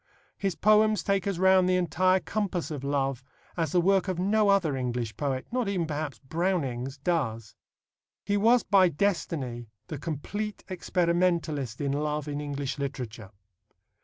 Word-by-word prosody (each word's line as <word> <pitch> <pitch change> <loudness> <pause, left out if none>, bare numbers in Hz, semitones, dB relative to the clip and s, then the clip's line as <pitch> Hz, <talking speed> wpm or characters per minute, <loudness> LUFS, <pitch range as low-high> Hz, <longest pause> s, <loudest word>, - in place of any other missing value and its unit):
His 195 -3 -2
poems 215 0 +4
take 195 -1 0
us 195 -3 -1
round 190 0 +5
the 185 - +3
entire 185 +2 +2
compass 195 -5 -2
of 145 -3 -5
love 135 -2 -1 0.3
as 165 -4 -1
the 180 - +3
work 195 +2 +3
of 185 -2 -1
no 205 +3 +2
other 185 -8 +3
English 120 -3 -3
poet 135 -3 -2
not 245 -4 0
even, 185 -4 0
perhaps, 150 -4 -4
Browning's 140 -4 -2
does. 130 - -2 0.7
He 205 - +1
was 230 +4 +4
by 190 -3 +5
destiny 145 - -2 0.2
the 150 - -5
complete 190 +8 -4
experimentalist 170 - 0
in 140 -1 -1
love 150 +1 -2
in 145 0 -3
English 145 -1 -4
literature. 125 -7 -5
165 Hz, 150 wpm, -28 LUFS, 140-190 Hz, 0.7 s, round